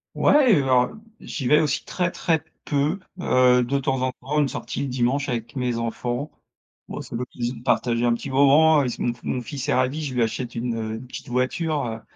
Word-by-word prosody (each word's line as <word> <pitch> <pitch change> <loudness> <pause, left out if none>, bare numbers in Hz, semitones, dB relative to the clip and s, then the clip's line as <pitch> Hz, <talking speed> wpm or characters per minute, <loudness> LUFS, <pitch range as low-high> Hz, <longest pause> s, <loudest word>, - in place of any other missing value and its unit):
Ouais 275 -7 +5
et - - +6
alors, 130 -2 +4
heu, 220 - -13 0.2
j'y 135 - -6
vais 150 +4 +5
aussi 150 -4 -1
très 180 -1 -1
très 160 -3 0 0.2
peu, 150 +6 0 0.2
heu, 125 -4 +4
de 135 +3 0
temps 135 -1 -1
en 130 0 0
temps 135 +4 -3
une 145 - +3
sortie 120 -1 -5
le 140 - -1
dimanche 130 +3 0
avec 115 0 -4
mes 125 -3 -1
enfants. 120 +4 -3 0.6
Bah - - -6
c'est - - -11
l'occasion 125 0 -4
de 115 - -11
partager 120 -1 +1
un 120 - +3
petit 135 +3 -6
moment, 145 +3 +5
is 125 -3 -2
mon 120 - 0
f 120 - -21
mon 130 - -2
fils 135 +4 -5
est - - +3
ravi, 130 +5 0
je 130 -3 -4
lui 120 - +3
achète 120 +2 -3
une, 120 0 -2
heu, 110 -1 -3
une 115 +3 -8
petite 125 - -9
voiture, 140 +5 0
heu, 115 -1 -5
130 Hz, 225 wpm, -23 LUFS, 120-145 Hz, 0.6 s, et